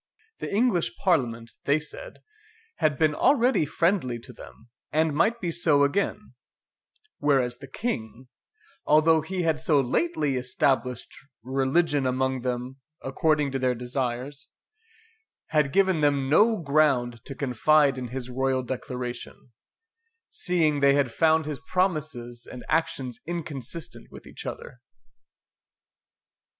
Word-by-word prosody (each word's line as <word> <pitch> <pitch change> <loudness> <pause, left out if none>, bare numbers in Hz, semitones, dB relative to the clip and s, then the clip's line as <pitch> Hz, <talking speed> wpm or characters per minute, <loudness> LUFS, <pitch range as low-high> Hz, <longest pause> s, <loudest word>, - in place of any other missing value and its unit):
The - - -5
English 185 - +1
Parliament, 120 -10 0
they 140 +2 +3
said, - - -8 0.5
had 155 -4 +1
been 155 0 +3
already 250 - +3
friendly 165 -6 0
to 125 +1 -10
them, 115 +1 -14 0.2
and 155 0 +2
might 220 +9 +2
be 175 -6 -2
so 155 -4 +3
again; 200 +4 -1 0.9
whereas 130 -4 +1
the 140 - -10
King, 125 - -4 0.6
although 155 +1 +4
he 180 +3 -3
had 160 -2 +1
so 155 -2 +3
lately 140 - 0
established 125 0 -1 0.3
religion 135 +3 +1
among 130 +1 0
them 125 +1 -3 0.3
according 150 +1 +1
to 135 - -2
their 125 -1 +1
desires, 125 +3 -4 1.0
had 150 -3 +2
given 190 -2 +3
them 140 -2 +2
no 215 +10 +4
ground 140 - +1
to 135 - -7
confide 140 +2 +3
in 130 -1 -5
his 125 0 -5
royal 130 +1 0
declaration, 125 -1 -6 0.8
seeing 160 -5 +1
they 140 0 +5
had 140 -4 +1
found 160 +2 +3
his 150 -2 -4
promises 155 -10 -2
and 125 - -9
actions 135 -7 -1
inconsistent 160 -3 -5
with - - -13
each - - -9
other. 125 - -8
140 Hz, 125 wpm, -26 LUFS, 125-160 Hz, 1.0 s, they